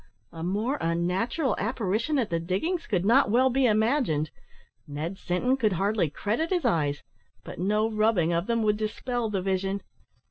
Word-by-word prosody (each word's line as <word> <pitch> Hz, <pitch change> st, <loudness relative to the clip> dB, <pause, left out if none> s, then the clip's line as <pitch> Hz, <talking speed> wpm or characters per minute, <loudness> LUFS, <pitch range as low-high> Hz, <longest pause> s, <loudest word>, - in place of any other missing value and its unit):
A 165 Hz, -, -9 dB
more 215 Hz, -, -1 dB
unnatural 180 Hz, -, 0 dB
apparition 225 Hz, +6 st, -1 dB
at 230 Hz, -8 st, -1 dB
the 170 Hz, -, +1 dB
diggings 255 Hz, -, -2 dB
could 190 Hz, -4 st, 0 dB
not 235 Hz, +2 st, +5 dB
well 255 Hz, +4 st, +4 dB
be 260 Hz, 0 st, +3 dB
imagined. 215 Hz, -, +1 dB, 0.6 s
Ned 155 Hz, +6 st, -5 dB
Sinton 190 Hz, +9 st, 0 dB
could 215 Hz, -6 st, +1 dB
hardly 195 Hz, -2 st, +1 dB
credit 220 Hz, -, -2 dB
his 360 Hz, -2 st, 0 dB
eyes, 145 Hz, -4 st, +1 dB, 0.4 s
but -, -, -9 dB
no 210 Hz, +4 st, +1 dB
rubbing 215 Hz, -6 st, +2 dB
of 170 Hz, +2 st, -1 dB
them 230 Hz, -1 st, +1 dB
would 210 Hz, -1 st, +2 dB
dispel 225 Hz, +2 st, -2 dB
the 195 Hz, -3 st, -2 dB
vision. 195 Hz, +1 st, -1 dB
210 Hz, 165 wpm, -27 LUFS, 180-240 Hz, 0.6 s, not